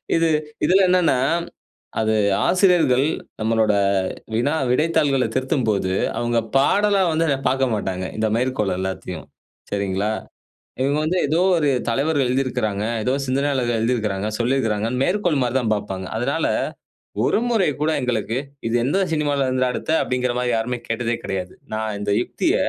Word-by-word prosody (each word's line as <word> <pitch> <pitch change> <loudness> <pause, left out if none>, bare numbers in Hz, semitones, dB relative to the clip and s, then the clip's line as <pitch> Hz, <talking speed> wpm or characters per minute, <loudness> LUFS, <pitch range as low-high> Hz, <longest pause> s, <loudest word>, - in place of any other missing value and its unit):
இது 165 0 +3 0.4
இதுல 190 +2 +4
என்னன்னா, 180 -7 +3 0.8
அது 110 0 +1 0.3
ஆசிரியர்கள் 175 -8 +4 0.3
நம்மளோட 110 -1 +2 0.6
வினா, 125 +7 +1 0.2
விடைத்தாள்கள 140 -1 +2
திருத்தும்போது, 120 - 0 0.3
அவுங்க 120 0 0 0.2
பாடலா 200 +8 +3
வந்து 165 +1 +1
அத 140 - +2
பாக்க 135 +1 +1
மாட்டாங்க. 95 -3 -3
இந்த 110 0 +1
மேற்கோள் 120 -7 0
எல்லாத்தையும். 95 0 -5 0.4
சரிங்களா? 100 +1 -1 0.7
இவங்க 140 +3 +1
வந்து 170 +4 0
ஏதோ 155 +4 +1 0.2
ஒரு 150 -3 +2 0.2
தலைவர்கள் 140 +2 +1
எழுதிருக்குறாங்க, 115 -6 -1 0.2
ஏதோ 125 - +1
சிந்தனையாளர்கள் 130 -3 0
எழுதிருக்குறாங்க, 110 -4 -1
சொல்லிருக்காங்கன்னு 120 -1 0
மேற்கோள் 180 -6 +1
மாரிதான் 125 -2 0
பார்ப்பாங்க. 95 -2 -5
அதனால 140 +8 0 0.8
ஒரு - - +2
முறை 220 -8 +2
கூட 155 +1 +2
எங்களுக்கு 120 -2 -1 0.3
இது 115 - -1
எந்த 145 +9 +1
சினிமாவுல 145 -3 +1
இருந்துடா 130 0 +1
எடுத்த, - - -4
அப்டிங்கற 125 -1 -1
மாரி 125 0 0
யாருமே 120 +2 -2
கேட்டதே 115 +1 -1
கெடையாது. 95 -1 -4 0.2
நான் 110 -1 -2
இந்த 105 - -2
யுக்திய - - -1
125 Hz, 130 wpm, -21 LUFS, 110-145 Hz, 0.8 s, இதுல